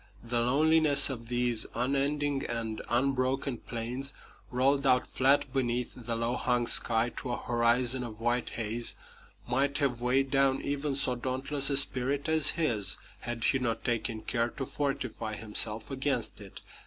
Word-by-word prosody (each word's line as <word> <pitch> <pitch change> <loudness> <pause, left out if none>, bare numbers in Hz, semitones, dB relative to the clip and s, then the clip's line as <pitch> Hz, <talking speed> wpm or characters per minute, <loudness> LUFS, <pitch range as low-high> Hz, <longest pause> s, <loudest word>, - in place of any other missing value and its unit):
The 120 0 -1
loneliness 150 +3 +5
of 115 -3 -7
these 120 -2 +1
unending 140 +3 0
and 115 -2 -4
unbroken 130 0 0
plains, 125 +4 -4 0.3
rolled 135 +2 +1
out 125 -1 +3
flat 135 0 +2
beneath 125 -2 -1
the 120 -2 -4
low 115 +2 -1
hung 120 -1 0
sky 115 0 +3
to 125 - -4
a - - -2
horizon 120 +1 +1
of 110 -3 -8
white 120 +1 -1
haze, 115 +1 -2 0.5
might 135 +3 0
have 130 -5 -1
weighed 130 +2 +1
down 135 -1 +2
even 145 0 -2
so 130 -2 +3
dauntless 135 +3 0
a 140 - +1
spirit 140 +1 +2
as 160 -1 +3
his 110 - +1 0.2
had 120 -1 -5
he 135 - +2
not 115 -3 -3
taken 115 -2 -2
care 120 -1 -1
to 135 0 -6
fortify 130 -6 -3
himself 110 +2 -2
against 135 -5 -2
it. 100 -2 -11
125 Hz, 155 wpm, -29 LUFS, 120-135 Hz, 0.5 s, loneliness